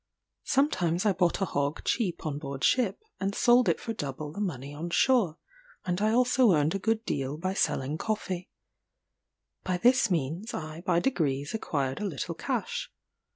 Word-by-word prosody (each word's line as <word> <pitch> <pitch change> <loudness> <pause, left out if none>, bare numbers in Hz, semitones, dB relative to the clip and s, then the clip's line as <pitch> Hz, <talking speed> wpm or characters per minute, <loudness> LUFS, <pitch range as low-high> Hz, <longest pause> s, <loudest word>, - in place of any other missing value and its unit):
Sometimes 185 - +1
I 205 - +4
bought 180 0 +1
a - - +3
hog 140 -2 -2
cheap 195 -10 -1
on 145 -2 -2
board 140 -2 -6
ship, 240 -7 +3 0.2
and 195 +1 -1
sold 240 -3 +5
it 165 - +1
for 230 - -4
double 145 -4 -5
the 205 - -5
money 140 -8 -3
on 160 +4 -5
shore; 210 -5 +3 0.5
and 180 +1 -1
I 215 - +3
also 250 -2 +4
earned 150 0 +2
a 195 - -1
good 225 +2 0
deal 140 +1 -2
by 185 +4 -2
selling 145 -4 0
coffee. 190 -4 -3 1.1
By 185 -1 0
this 245 +3 +4
means 170 - -2
I 155 +1 -6
by 175 -3 +2
degrees 145 - 0
acquired 140 -10 -2
a - - -1
little 155 - -3
cash. - - -3
175 Hz, 170 wpm, -28 LUFS, 150-215 Hz, 1.1 s, sold